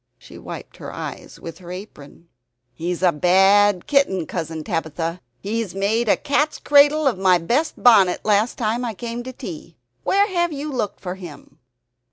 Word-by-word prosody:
She - - -14
wiped - - -9
her - - -8
eyes - - -8
with 165 +1 -9
her 175 -1 -10
apron. 170 -4 -11 0.5
"He's 175 +4 -4
a 180 - +5
bad 195 +4 +4
kitten, 235 - +1
Cousin 160 -2 -5
Tabitha; 165 -1 -3 0.2
he 225 +3 -2
made 215 +4 0
a - - +4
cat's 295 +1 0
cradle 290 +1 +4
of 240 -9 +1
my 185 -2 +4
best 245 - 0
bonnet 200 -7 +5
last 215 +2 +2
time 230 +1 -1
I 230 -3 -3
came 235 +2 -5
to 255 +2 -7
tea. 170 - -9 0.3
Where 400 +1 +3
have 345 -4 0
you 295 +1 -5
looked 235 -6 -3
for 180 -2 -4
him?" 175 -6 -12
205 Hz, 170 wpm, -21 LUFS, 175-250 Hz, 0.5 s, a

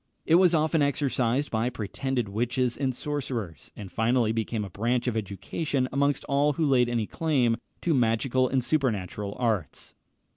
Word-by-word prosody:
It 160 - +2
was 175 0 +6
often 155 0 +2
exercised 135 -1 0
by 115 +2 0
pretended 125 +1 -3
witches 120 +4 0
and 130 -3 -1
sorcerers, 125 - -4
and 100 -3 -9
finally 115 +2 +2
became 110 -1 -2
a - - -8
branch 120 +6 0
of 125 -3 -1
education 110 - -2
amongst 140 +1 +1
all 145 +1 +2
who 160 +2 0
laid 125 -4 +3
any 115 -3 0
claim 130 -5 +1 0.2
to 170 - +1
magical 125 +1 +2
and 130 -2 +1
supernatural 105 - -1
arts. 110 - -2
125 Hz, 155 wpm, -27 LUFS, 110-140 Hz, 0.2 s, was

